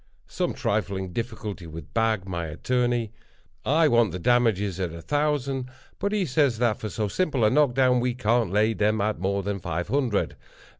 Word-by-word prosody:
Some -, -, -2 dB
trifling 95 Hz, -1 st, -2 dB
difficulty 105 Hz, -5 st, -5 dB
with 80 Hz, -2 st, -10 dB
Bag, 110 Hz, -4 st, +1 dB
my 85 Hz, -3 st, -3 dB
attorney. 120 Hz, +6 st, 0 dB, 0.5 s
I 155 Hz, +3 st, +4 dB
want 120 Hz, -, +3 dB
the 90 Hz, -, -4 dB
damages 105 Hz, -3 st, +2 dB
at 90 Hz, -3 st, -2 dB
a 85 Hz, 0 st, -8 dB
thousand, 140 Hz, -3 st, -1 dB, 0.3 s
but 200 Hz, -, -1 dB
he 210 Hz, -3 st, +1 dB
says 140 Hz, -4 st, +2 dB
that 120 Hz, -2 st, +1 dB
for 110 Hz, -, -4 dB
so 105 Hz, +1 st, -2 dB
simple 140 Hz, -, +1 dB
a 105 Hz, -, +4 dB
knock 140 Hz, -3 st, +3 dB
down 130 Hz, -2 st, +4 dB
we 125 Hz, 0 st, 0 dB
can't 115 Hz, -3 st, +1 dB
lay 105 Hz, +4 st, +2 dB
them 110 Hz, 0 st, +1 dB
at 105 Hz, -1 st, 0 dB
more 100 Hz, +2 st, -1 dB
than 100 Hz, 0 st, -2 dB
five 85 Hz, +1 st, -3 dB
hundred. 125 Hz, -5 st, 0 dB
110 Hz, 185 wpm, -25 LUFS, 95-125 Hz, 0.5 s, I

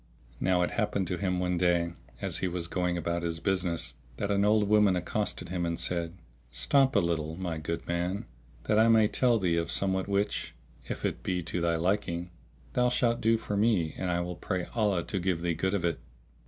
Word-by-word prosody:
Now 90 Hz, -1 st, +2 dB
it -, -, -1 dB
happened 105 Hz, -4 st, 0 dB
to 90 Hz, -, -1 dB
him 90 Hz, -1 st, 0 dB
one 90 Hz, -1 st, 0 dB
day, 85 Hz, -1 st, +2 dB, 0.3 s
as -, -, -1 dB
he 95 Hz, -, 0 dB
was 85 Hz, -1 st, -3 dB
going 90 Hz, -1 st, -1 dB
about 85 Hz, 0 st, -1 dB
his 85 Hz, -1 st, -2 dB
business, 90 Hz, -3 st, -1 dB, 0.2 s
that 100 Hz, +6 st, -1 dB
an 100 Hz, 0 st, +2 dB
old 105 Hz, 0 st, +3 dB
woman 105 Hz, -2 st, +5 dB
accosted 90 Hz, -, -2 dB
him 90 Hz, -1 st, -2 dB
and 85 Hz, -1 st, -1 dB
said, 85 Hz, 0 st, -1 dB, 0.3 s
"Stop 135 Hz, -, +2 dB
a -, -, +6 dB
little, 80 Hz, -3 st, -1 dB
my 85 Hz, -3 st, -3 dB
good 85 Hz, +2 st, -4 dB
man, 85 Hz, +3 st, -1 dB, 0.4 s
that 105 Hz, -, +2 dB
I 110 Hz, -, +6 dB
may 110 Hz, -2 st, +6 dB
tell 120 Hz, +1 st, +3 dB
thee 90 Hz, -5 st, +1 dB
of 85 Hz, -, -1 dB
somewhat 95 Hz, -1 st, +1 dB
which, 100 Hz, +1 st, -1 dB, 0.3 s
if -, -, -3 dB
it -, -, -2 dB
be 90 Hz, -2 st, -1 dB
to 85 Hz, +1 st, -3 dB
thy 85 Hz, 0 st, +2 dB
liking, 90 Hz, 0 st, -1 dB, 0.4 s
thou 125 Hz, 0 st, +3 dB
shalt 120 Hz, -1 st, +1 dB
do 115 Hz, +1 st, +4 dB
for 105 Hz, -2 st, -4 dB
me 100 Hz, -7 st, +2 dB
and 95 Hz, -, -2 dB
I 85 Hz, 0 st, +1 dB
will 90 Hz, 0 st, -4 dB
pray 90 Hz, -3 st, -2 dB
Allah 105 Hz, -6 st, +1 dB
to 95 Hz, -, -3 dB
give 90 Hz, -2 st, -1 dB
thee 85 Hz, -1 st, +1 dB
good 95 Hz, +4 st, 0 dB
of 90 Hz, -4 st, -1 dB
it!" 85 Hz, -, 0 dB
90 Hz, 210 wpm, -29 LUFS, 85-100 Hz, 0.4 s, a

